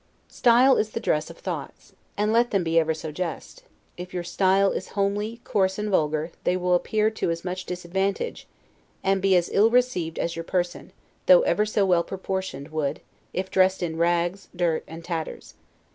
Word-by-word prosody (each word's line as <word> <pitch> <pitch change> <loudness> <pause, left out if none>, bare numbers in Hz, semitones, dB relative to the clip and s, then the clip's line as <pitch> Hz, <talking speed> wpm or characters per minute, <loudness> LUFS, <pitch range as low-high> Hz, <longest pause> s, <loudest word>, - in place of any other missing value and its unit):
Style 250 +2 +5
is 215 - +1
the 230 - -4
dress 155 -8 0
of - - -11
thoughts; - - -7 0.2
and 210 +1 +1
let 240 +1 +3
them 195 -3 +1
be 165 0 +3
ever 160 0 +1
so 160 0 -5
just, 180 - -5 0.4
if 180 +1 -8
your 175 - -2
style 190 +2 +2
is - - -4
homely, 205 +3 -1
coarse, 190 -1 +1
and 210 0 -2
vulgar, 155 -2 +1
they 180 - +1
will 180 0 +1
appear 215 +5 +2
to 215 - -2
as 165 +1 -3
much 185 0 -4
disadvantage, 190 - -2 0.6
and 195 0 +2
be 195 0 +4
as 175 -1 +1
ill 215 +3 +5
received 230 -10 +1
as 170 - -2
your 165 - -4
person, 175 0 -2 0.4
though - - +8
ever 215 - +1
so 210 -1 +1
well 175 -2 +3
proportioned, 190 -7 -5
would, 155 -2 -2 0.3
if 190 +1 -3
dressed 190 0 +3
in 160 -2 -2
rags, 175 +3 0
dirt, 170 -2 0
and 165 +1 -10
tatters. 165 -2 -5
185 Hz, 185 wpm, -25 LUFS, 170-205 Hz, 0.6 s, though